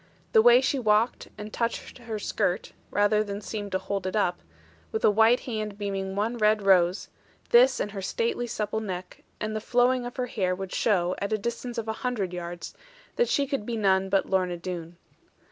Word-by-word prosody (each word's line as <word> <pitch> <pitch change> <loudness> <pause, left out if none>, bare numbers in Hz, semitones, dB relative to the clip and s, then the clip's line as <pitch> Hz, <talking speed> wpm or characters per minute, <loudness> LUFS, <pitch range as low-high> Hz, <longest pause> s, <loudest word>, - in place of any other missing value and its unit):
The 220 - +6
way 240 +2 +7
she 270 +1 0
walked, 215 0 +2
and 210 0 -8
touched 235 +2 -3
her 230 -3 -5
skirt 185 -3 -1 0.2
(rather 205 +1 +3
than 200 -1 -5
seemed 205 -1 -5
to - - +3
hold 195 0 -3
it 185 - -3
up) 180 -4 +1 0.5
with 220 - 0
a - - +6
white 225 +4 +4
hand 215 -4 -4
beaming 195 -2 -3
one 225 +4 -1
red 215 -1 +3
rose, 185 -1 +3 0.4
this 250 +2 +6
and 205 - -2
her 195 -1 -5
stately 460 - -1
supple 220 -1 -2
neck, 185 -4 -6 0.2
and 215 0 -3
the 215 - -2
flowing 245 +2 +2
of 245 - -9
her 250 - 0
hair 185 -6 -1
would 190 0 -6
show, 180 -5 +2
at 200 - -3
a - - +2
distance 235 +3 -4
of 225 -1 -3
a 220 - -1
hundred 220 -8 -2
yards, 175 0 -6 0.4
that 480 0 +2
she 280 - +2
could 275 -5 -2
be 230 +1 -3
none 190 -2 +2
but 195 0 +2
Lorna 185 -2 0
Doone. 170 -1 -6
210 Hz, 200 wpm, -27 LUFS, 190-235 Hz, 0.5 s, way